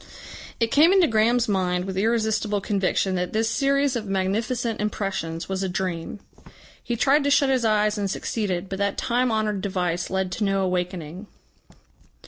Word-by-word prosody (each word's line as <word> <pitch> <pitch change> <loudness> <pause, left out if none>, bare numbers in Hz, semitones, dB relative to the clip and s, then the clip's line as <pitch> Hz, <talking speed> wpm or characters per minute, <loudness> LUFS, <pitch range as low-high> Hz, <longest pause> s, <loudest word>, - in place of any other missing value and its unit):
It 230 -1 +1
came 315 +5 +6
into 380 -2 +5
Graham's 230 0 +2
mind 180 -3 0
with 190 -1 -5
irresistible 215 0 0
conviction 195 -1 0
that 180 -1 -2
this 220 +1 +1
series 275 +3 +1
of 220 -3 -3
magnificent 215 +4 -1
impressions 190 -6 -3
was 190 0 -3
a 190 - -1
dream. 180 +1 -3 0.6
He 240 - -3
tried 280 +5 +3
to 285 - +1
shut 280 -1 +4
his 260 -2 +1
eyes 215 -1 +2
and 200 -1 -1
succeeded, 190 -3 -2
but 195 0 -5
that 200 0 0
time 250 0 +1
honoured 215 -3 -1
device 180 -3 -2
led 190 -1 -1
to 215 - -2
no 195 -1 +1
awakening. 180 0 -3
205 Hz, 165 wpm, -24 LUFS, 190-230 Hz, 0.6 s, came